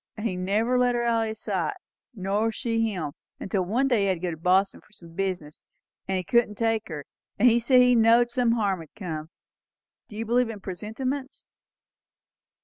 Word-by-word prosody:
And 210 - -5
he 185 - -3
never 215 +7 +1
left 245 -1 +3
her 240 - 0
out 230 -1 +2
o' - - -3
his 220 0 -6
sight, 185 -7 -2 0.4
nor 205 +3 0
she 225 -1 -1
him; 160 -7 -4 0.3
until 195 -1 -1
one 235 +9 +1
day 245 -4 +2
he - - +2
had 190 - +2
to - - -10
go 180 0 -2
to 160 - -6
Boston 185 +4 +2
for - - -27
some 170 -5 -15
business; 180 -5 -4 0.4
and 190 - 0
he 185 - -2
couldn't 235 +1 +2
take 225 0 0
her; 150 -4 -6 0.3
and 240 - +5
he 235 0 +5
said 250 +2 +5
he 250 0 +5
knowed 235 +1 +5
some 240 -2 +2
harm'd 195 -8 -1
come. 160 -7 -5 0.8
Do 210 - -11
you 225 +2 -3
believe 240 +1 +2
in 220 -2 -6
presentiments." 255 +9 -5
215 Hz, 200 wpm, -26 LUFS, 185-235 Hz, 0.8 s, and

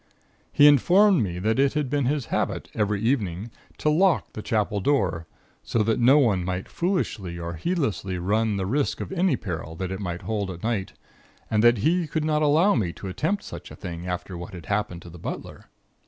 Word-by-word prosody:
He 145 - +5
informed 180 - +6
me 90 -5 -2
that 110 +7 0
it 140 +1 +3
had 150 -2 0
been 140 0 0
his 140 -1 0
habit - - -2
every 105 -1 0
evening 110 -4 -1 0.3
to 150 - +1
lock 180 +3 +2
the 110 - -6
Chapel 105 -2 0
door, 95 - 0 0.3
so 115 - 0
that 110 +1 +1
no 130 +4 +6
one 110 -11 +3
might 90 +1 -3
foolishly 140 - -2
or 85 0 -5
heedlessly 100 - -2
run 105 +4 0
the 95 - -1
risk 140 +8 0
of - - -5
any 190 -1 +2
peril 85 -5 -5
that 95 +2 -4
it 95 - -4
might 90 -3 -4
hold 105 -3 -2
at 85 -2 -8
night, 110 -5 -2 0.6
and 110 0 +2
that 120 0 +6
he 165 - +1
could 155 0 -2
not 155 -1 +1
allow 155 +7 +4
me 95 -8 0
to 95 - -7
attempt 165 - -1
such - - -9
a - - -10
thing 85 -2 -7
after 90 +1 -4
what 85 +2 -8
had 85 - -9
happened 105 -4 -2
to 85 - -10
the 85 - -12
butler. - - -7
110 Hz, 205 wpm, -25 LUFS, 90-145 Hz, 0.6 s, informed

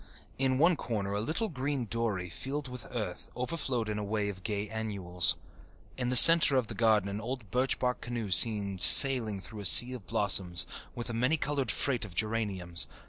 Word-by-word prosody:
In 130 -1 0
one 170 +5 +2
corner 100 -6 -5
a 100 - -3
little 160 - -3
green 135 - -5
dory, 110 -5 -4
filled 135 - -7
with 125 -2 -10
earth, - - -7
overflowed 125 -3 -4
in 105 0 -5
a - - -5
wave 100 -1 -4
of 95 - -18
gay 105 0 -4
annuals. 95 -6 0 0.6
In 125 -1 -4
the 125 - -2
centre 165 +1 +8
of 130 -2 0
the - - -8
garden 110 -4 0
an 100 +2 -6
old 120 -3 -8
birch 130 +2 -1
bark 125 0 -3
canoe 120 -4 -7
seemed 100 0 +3
sailing 120 -7 +7
through 105 +3 -12
a 100 - -8
sea 125 +6 +5
of 115 -9 -11
blossoms, 90 -4 +1 0.3
with 120 0 -6
a - - -7
many 125 +8 -1
coloured 145 -2 -4
freight 130 -5 -2
of 100 -5 -10
geraniums. 100 -6 -2
115 Hz, 195 wpm, -28 LUFS, 100-130 Hz, 0.6 s, centre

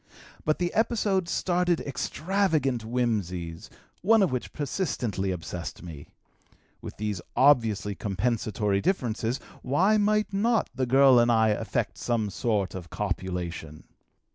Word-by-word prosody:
But 155 - +1
the 175 -1 -1
episode 205 -5 +1
started 180 -2 +1
extravagant 155 - 0
whimsies, 100 -9 -2 0.3
one 220 +3 +5
of 185 - +1
which 125 -1 -3
persistently 125 - -2
obsessed 90 -1 -5
me: 80 -5 -9 0.7
with - - -9
these 105 -3 -3
obviously 115 -7 +3
compensatory 105 0 -1
differences, 120 - -1 0.2
why 185 +11 +3
might 210 0 +1
not 225 +3 +1
the 130 -1 -1
girl 135 0 +6
and 120 0 +4
I 110 -1 +4
effect 105 - -2
some 110 -4 -1
sort 105 -2 -1
of 90 -3 -7
copulation? 90 -6 -4
120 Hz, 120 wpm, -27 LUFS, -, 0.7 s, girl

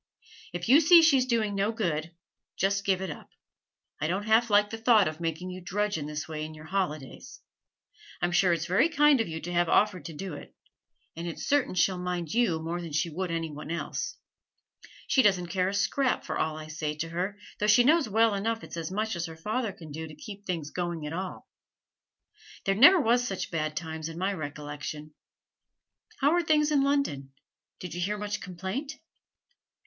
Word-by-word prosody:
'If 175 0 -4
you 270 +6 +8
see 335 +2 +8
she's 270 -5 +4
doing 225 -4 +1
no 200 +2 +1
good, 170 -8 -2 0.5
just 200 +1 +1
give 190 -1 +2
it 190 - -3
up. - - -10 0.7
I 150 - 0
don't 190 +5 -1
half 225 +2 +4
like 205 0 +4
the 225 - -5
thought 225 -4 +5
of 155 +1 -5
making 170 +2 -3
you 185 0 -8
drudge 205 +4 -1
in 150 -2 -3
this 150 +2 -5
way 155 -2 -5
in 155 0 -7
your 155 0 -12
holidays. 155 -6 -4 0.8
I'm 175 +1 0
sure 175 +1 +4
it's 165 -1 0
very 215 - +3
kind 295 -4 +4
of - - -2
you 160 -1 -5
to 175 +2 -5
have 175 -1 +2
offered 195 -7 +2
to 165 - -6
do 185 +3 -6
it, 145 - -10 0.6
and 170 +1 -5
it's 170 - -5
certain 285 -9 +2
she'll 185 +1 +2
mind 180 -3 -3
you 225 -9 +2
more 170 +2 -3
than 165 -3 -7
she 160 +2 0
would 185 +3 -3
any 165 -1 -2
one 150 +1 -8
else. 170 0 -4 0.9
She 265 - +4
doesn't 185 -6 +2
care 185 0 0
a - - -4
scrap 245 +7 +1
for - - -3
all 155 0 -1
I 155 - -7
say 155 -1 -4
to 165 +2 -4
her, 185 +4 -3 0.2
though 210 - +1
she 230 +3 +6
knows 300 -1 +4
well 225 +1 +3
enough 225 +3 -2
it's - - -8
as 165 -2 -3
much 215 +2 -2
as 170 0 -3
her 160 0 -10
father 215 +6 -2
can 160 -4 -12
do 160 +2 -6
to 155 - -11
keep 205 -5 -10
things 165 -5 -3
going 175 -3 -3
at 150 - -5
all. 185 +2 -5 1.2
There 195 - +3
never 290 - +8
was 245 -2 +2
such 190 - -4
bad 155 -2 -2
times 160 -1 -4
in 165 - -8
my 190 +3 0
recollection! 150 -1 -6 1.1
How 285 +2 +4
are 350 +1 +3
things 305 -2 +2
in 285 -2 +4
London? 275 - 0 0.5
Did 180 -3 -7
you 175 - -4
hear 205 +4 -1
much 210 0 -4
complaint?' 195 - -5
185 Hz, 205 wpm, -28 LUFS, 160-220 Hz, 1.2 s, you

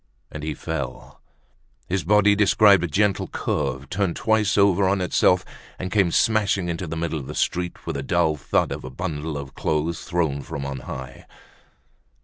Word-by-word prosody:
And 75 - -7
he 75 0 -3
fell. 70 -4 -6 0.7
His 95 -1 -1
body 105 +3 +4
described 100 -1 +5
a - - 0
gentle 100 +3 +1
curve, 70 +2 -2
turned 95 -3 0
twice 110 -3 +1
over 100 -1 +4
on 100 0 +1
itself, 90 0 +2 0.3
and 90 -1 -5
came 100 -4 +3
smashing 100 -2 +2
into 85 +1 -3
the 80 +1 -4
middle 80 -1 -2
of 65 - -8
the - - -7
street 90 0 -2
with 85 - -3
the 70 - -2
dull 80 +2 +1
thud 75 - 0
of - - -5
a 65 - -6
bundle 80 0 -4
of 70 -1 -7
clothes 80 +2 -1
thrown 80 -6 -1
from 70 0 -6
on 70 -1 -4
high. 65 0 -8
85 Hz, 175 wpm, -23 LUFS, 75-100 Hz, 0.7 s, described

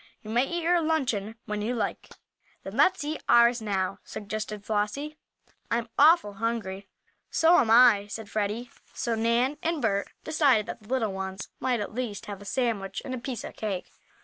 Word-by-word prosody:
You 215 - -7
may 245 +4 +2
eat 345 -1 -3
your 345 +1 +3
luncheon 255 -10 -1
when 210 0 -3
you 235 +4 -1
like." 230 - -3 0.5
"Then - - -7
let's 375 -4 +3
eat 300 +1 -4
ours 235 0 +6
now," 195 -2 -1
suggested 210 0 -6
Flossie. 220 +9 -2 0.5
"I'm 235 0 -1
awful 300 -8 +6
hungry." 200 -4 -2 0.4
"So 330 +2 +5
am 230 - +2
I," 225 -3 +6
said 215 +1 -7
Freddie. 215 +4 -2 0.2
So 235 - -1
Nan 235 +5 +1
and 330 -1 -1
Bert 200 -5 0 0.2
decided 280 -9 +3
that - - -7
the 215 - -18
little 230 -6 0
ones 190 0 -5
might 245 -4 0
at 205 - -5
least 230 -4 -4
have 200 -1 -7
a - - -11
sandwich 220 -4 -2
and 260 - -4
a 255 - -3
piece 245 0 -5
of - - -8
cake. 200 -4 -4
230 Hz, 180 wpm, -27 LUFS, 205-260 Hz, 0.5 s, ours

